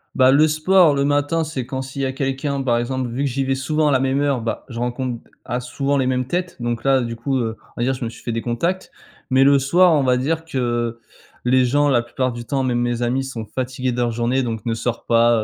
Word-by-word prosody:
Bah, 130 Hz, -1 st, +5 dB
le 150 Hz, +3 st, +5 dB
sport 155 Hz, +1 st, +4 dB
le 140 Hz, 0 st, +1 dB
matin, 145 Hz, +3 st, +1 dB
c'est 145 Hz, -5 st, -4 dB
quand 130 Hz, -1 st, -3 dB
s'il 135 Hz, +1 st, -6 dB
y 135 Hz, -, +1 dB
a 130 Hz, -, -1 dB
quelqu'un 135 Hz, +1 st, -2 dB
par 120 Hz, -3 st, +2 dB
exemple. 125 Hz, +1 st, -2 dB
Vu 125 Hz, +4 st, -2 dB
que 140 Hz, -, 0 dB
j'y 135 Hz, +2 st, -1 dB
vais 135 Hz, 0 st, 0 dB
souvent 150 Hz, +3 st, 0 dB
à -, -, +2 dB
la 130 Hz, -, +3 dB
même 135 Hz, +1 st, +1 dB
heure, 140 Hz, -4 st, +1 dB
bah, 115 Hz, -, -4 dB
je 115 Hz, -2 st, -6 dB
rencontre 125 Hz, 0 st, -3 dB, 0.2 s
ah, 125 Hz, 0 st, -2 dB
souvent 140 Hz, +3 st, -1 dB
les 130 Hz, -, +1 dB
mêmes 125 Hz, 0 st, 0 dB
têtes, 180 Hz, +4 st, -3 dB
donc 120 Hz, -1 st, -2 dB
là 135 Hz, -1 st, +3 dB
du 115 Hz, -1 st, -4 dB
coup, 130 Hz, +4 st, -1 dB
heu, 115 Hz, -2 st, -2 dB, 0.2 s
on -, -, -4 dB
va -, -, +2 dB
dire 130 Hz, +2 st, +1 dB
je 125 Hz, -, -6 dB
me 115 Hz, -, -2 dB
suis -, -, -13 dB
fait 120 Hz, -, -3 dB
des 115 Hz, 0 st, -2 dB
contacts. 170 Hz, +11 st, -2 dB, 0.4 s
Mais 130 Hz, +1 st, +4 dB
le 140 Hz, 0 st, +5 dB
soir, 170 Hz, +6 st, +4 dB
on 145 Hz, -3 st, +3 dB
va 125 Hz, -1 st, +3 dB
dire 160 Hz, +5 st, -1 dB
que, 165 Hz, -5 st, -5 dB
heu, 120 Hz, -2 st, -1 dB, 0.5 s
les 130 Hz, +1 st, +4 dB
gens 145 Hz, +4 st, +2 dB
la 125 Hz, -4 st, +3 dB
plupart 125 Hz, +2 st, -2 dB
du 120 Hz, 0 st, -7 dB
temps 135 Hz, +3 st, -1 dB
même 125 Hz, -2 st, 0 dB
mes 120 Hz, 0 st, -1 dB
amis 130 Hz, +3 st, 0 dB
sont 120 Hz, -4 st, -6 dB
fatigués 130 Hz, +1 st, -3 dB
de 120 Hz, -, -5 dB
leur 120 Hz, -1 st, +1 dB
journée 120 Hz, +3 st, 0 dB
et 130 Hz, -, +1 dB
donc 115 Hz, -3 st, -4 dB
ne 115 Hz, -, 0 dB
sortent 120 Hz, +1 st, -3 dB
pas, 115 Hz, -1 st, +4 dB
130 Hz, 275 wpm, -21 LUFS, 120-140 Hz, 0.5 s, Bah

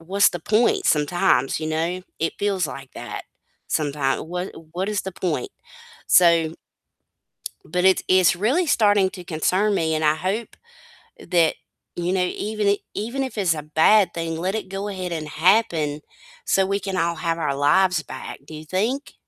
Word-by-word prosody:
What's 195 Hz, +5 st, +3 dB
the 175 Hz, -, -6 dB
point?" 220 Hz, +7 st, +2 dB
Sometimes, 150 Hz, -2 st, +2 dB
you 155 Hz, -, -3 dB
know, 165 Hz, +4 st, -2 dB, 0.2 s
it 165 Hz, -, -1 dB
feels 195 Hz, -4 st, 0 dB
like 135 Hz, -1 st, -9 dB
that -, -, -7 dB, 0.5 s
sometimes. 145 Hz, -3 st, 0 dB
What 180 Hz, +3 st, -5 dB, 0.2 s
what 185 Hz, +4 st, -2 dB
is 210 Hz, -2 st, -1 dB
the 190 Hz, -, -6 dB
point? 160 Hz, -10 st, -3 dB, 0.6 s
So 170 Hz, -2 st, +4 dB, 1.1 s
but 180 Hz, +3 st, -1 dB
it's 190 Hz, -, +4 dB
it's 185 Hz, -1 st, +4 dB
really 260 Hz, -, +1 dB
starting 205 Hz, -8 st, +3 dB
to 180 Hz, -3 st, -9 dB
concern 185 Hz, +6 st, +1 dB
me, 160 Hz, -3 st, 0 dB
and 155 Hz, -, -1 dB
I 150 Hz, 0 st, +3 dB
hope 195 Hz, +7 st, -3 dB, 0.6 s
that, 170 Hz, -, +2 dB, 0.4 s
you 175 Hz, +1 st, -1 dB
know, 185 Hz, -, +1 dB
even 210 Hz, +3 st, -2 dB
i 200 Hz, -, +3 dB, 0.2 s
even 240 Hz, +6 st, -3 dB
if 260 Hz, -4 st, -6 dB
it's 180 Hz, -5 st, +2 dB
a 150 Hz, -, -6 dB
bad 175 Hz, +5 st, +4 dB
thing, 165 Hz, -1 st, -3 dB
let 185 Hz, +3 st, -2 dB
it 215 Hz, -4 st, -4 dB
go 195 Hz, +2 st, -4 dB
ahead 185 Hz, -3 st, -5 dB
and 155 Hz, -2 st, -4 dB
happen 160 Hz, -4 st, +2 dB, 0.4 s
so 195 Hz, -1 st, +2 dB
we 200 Hz, +1 st, -1 dB
can 190 Hz, 0 st, -4 dB
all 170 Hz, 0 st, 0 dB
have 165 Hz, +1 st, -2 dB
our 150 Hz, -4 st, -1 dB
lives 160 Hz, +4 st, +3 dB
back. -, -, -8 dB
Do 160 Hz, -, -12 dB
you 155 Hz, +1 st, -9 dB
think? 225 Hz, -, -2 dB
180 Hz, 175 wpm, -22 LUFS, 160-200 Hz, 1.1 s, So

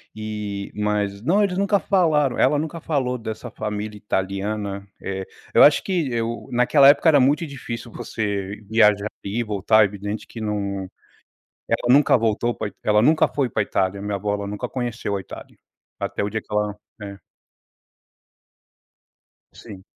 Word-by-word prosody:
E, 105 Hz, -2 st, -5 dB
mas, 105 Hz, -1 st, -1 dB
não, 190 Hz, -, +3 dB
eles 185 Hz, -3 st, 0 dB
nunca 200 Hz, +1 st, +2 dB
falaram, 155 Hz, -10 st, +2 dB
ela 145 Hz, +2 st, +3 dB
nunca 160 Hz, +2 st, -4 dB
falou 135 Hz, -6 st, -1 dB
dessa 110 Hz, -2 st, -6 dB
família 105 Hz, 0 st, -5 dB
italiana. 100 Hz, 0 st, -3 dB
Eh, 95 Hz, 0 st, -4 dB, 0.3 s
eu -, -, +7 dB
acho 145 Hz, -, +6 dB
que 170 Hz, -8 st, -1 dB
eu, 115 Hz, 0 st, -3 dB
naquela 125 Hz, +3 st, +5 dB
época 150 Hz, +3 st, +5 dB
era 145 Hz, -3 st, +6 dB
muito 145 Hz, +5 st, +3 dB
difícil 120 Hz, -4 st, -7 dB
você 100 Hz, -3 st, -3 dB
viajar 105 Hz, -2 st, +4 dB, 0.2 s
ir 100 Hz, +4 st, -3 dB
e -, -, +1 dB
voltar, 105 Hz, 0 st, +3 dB
é -, -, +5 dB
evidente 105 Hz, +1 st, -5 dB
que 115 Hz, -, -9 dB
não, 100 Hz, -3 st, -3 dB, 0.8 s
ela 120 Hz, +1 st, +2 dB
nunca 140 Hz, -1 st, +5 dB
voltou 115 Hz, +1 st, 0 dB
pra -, -, -3 dB
Ita 100 Hz, -, -25 dB
ela 105 Hz, 0 st, +3 dB
nunca 155 Hz, +7 st, +4 dB
foi 140 Hz, -4 st, -1 dB
pra 105 Hz, -, 0 dB
Itália, 100 Hz, 0 st, -1 dB
minha 105 Hz, 0 st, -2 dB
avó, 100 Hz, +1 st, -2 dB
ela 100 Hz, 0 st, -5 dB
nunca 105 Hz, 0 st, -4 dB
conheceu 120 Hz, -5 st, -3 dB
a -, -, -4 dB
Itália. -, -, -12 dB, 0.4 s
Até -, -, -2 dB
o 100 Hz, -, -1 dB
dia 110 Hz, +1 st, -3 dB
que -, -, -32 dB
ela, 105 Hz, -1 st, 0 dB, 0.3 s
é 100 Hz, -1 st, -8 dB, 2.3 s
Sim. 100 Hz, -5 st, -12 dB
110 Hz, 165 wpm, -22 LUFS, 100-130 Hz, 2.3 s, eu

